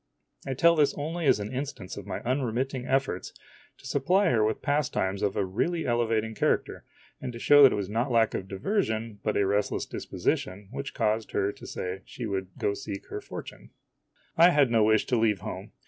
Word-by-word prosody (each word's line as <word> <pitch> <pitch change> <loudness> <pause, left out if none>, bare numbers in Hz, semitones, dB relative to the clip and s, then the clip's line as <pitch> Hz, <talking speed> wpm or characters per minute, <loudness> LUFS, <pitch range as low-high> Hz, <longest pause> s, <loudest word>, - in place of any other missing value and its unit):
I 135 - -2
tell 170 +5 +5
this 150 -3 +3
only 160 +2 -2
as 105 - +5
an 105 +4 -5
instance 130 -7 -5
of 100 -1 -9
my - - -4
unremitting 130 0 -1
efforts 135 -9 -1 0.4
to - - -18
supply 190 +1 +2
her 110 -3 +3
with 110 0 -1
pastimes 130 -10 0
of 100 - 0
a 100 - +1
really 165 - -1
elevating 115 -2 0
character, - - -1 0.4
and 125 - -4
to - - -7
show 145 +4 +6
that 135 -3 +9
it - - 0
was 100 -2 -2
not 115 +6 -1
lack 115 -2 +3
of 95 - -4
diversion, 110 - -2
but 105 - -1
a 100 - +3
restless 100 +1 0
disposition, 95 +1 -3
which 140 +1 -6
caused 110 +1 0
her 100 - +1
to - - -12
say 90 +1 -5
she 120 - -7
would 95 -3 -2
go - - 0
to - - -4
seek 100 - -7
her - - -5
fortune. - - -9 0.7
I 170 +2 +8
had 145 -7 +3
no 115 -2 +4
wish 110 0 +3
to 125 - +1
leave 105 -4 +2
home. - - -7
115 Hz, 205 wpm, -27 LUFS, 100-140 Hz, 0.7 s, that